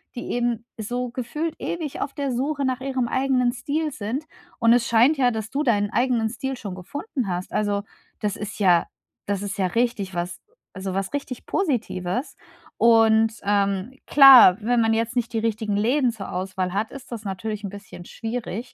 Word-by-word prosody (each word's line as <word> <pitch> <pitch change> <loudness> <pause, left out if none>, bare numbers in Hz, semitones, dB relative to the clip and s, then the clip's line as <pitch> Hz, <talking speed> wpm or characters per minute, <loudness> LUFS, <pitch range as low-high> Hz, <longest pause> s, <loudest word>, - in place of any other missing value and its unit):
die 245 - -5
eben 240 -1 -1
so 245 +3 -3
gefühlt 300 +7 -3
ewig 320 -5 -4
auf 280 - -3
der 280 -3 -2
Suche 275 +3 -1
nach 255 -1 -1
ihrem 260 -2 -1
eigenen 255 -1 +1
Stil 295 +5 -2
sind. 250 +5 -4 0.3
Und 230 0 +5
es 240 -1 +2
scheint 240 +7 +4
ja, 255 -2 +4
dass 220 -1 -5
du 280 - -1
deinen 205 -6 +1
eigenen 240 -3 +1
Stil 265 +3 -4
schon 200 -5 -6
gefunden 265 - -5
hast. 180 0 -4
Also, 205 -1 0 0.4
das 205 -1 -1
ist 210 0 -6
ja 180 -4 +4 0.4
das 200 -1 -1
ist 200 +1 -4
ja 190 - +2
richtig 225 -3 -1
was 175 +1 -4 0.3
also 190 -1 -5
was 195 0 -2
richtig 280 -3 -5
Positives. 245 - -2 0.4
Und, 225 -1 +5
ähm, 200 +2 0
klar, 265 -10 +9
wenn 240 +3 +1
man 225 0 +2
jetzt 230 +1 -1
nicht 240 -1 -1
die 225 - +1
richtigen 220 -2 -1
Läden 245 +5 +2
zur 220 -4 -8
Auswahl 185 0 -3
hat, 210 +3 -1
ist 275 -1 -11
das 230 -2 -6
natürlich 210 +2 -4
'n 200 - -4
bisschen 200 -3 -11
schwierig. 230 0 -5
230 Hz, 185 wpm, -23 LUFS, 205-255 Hz, 0.4 s, klar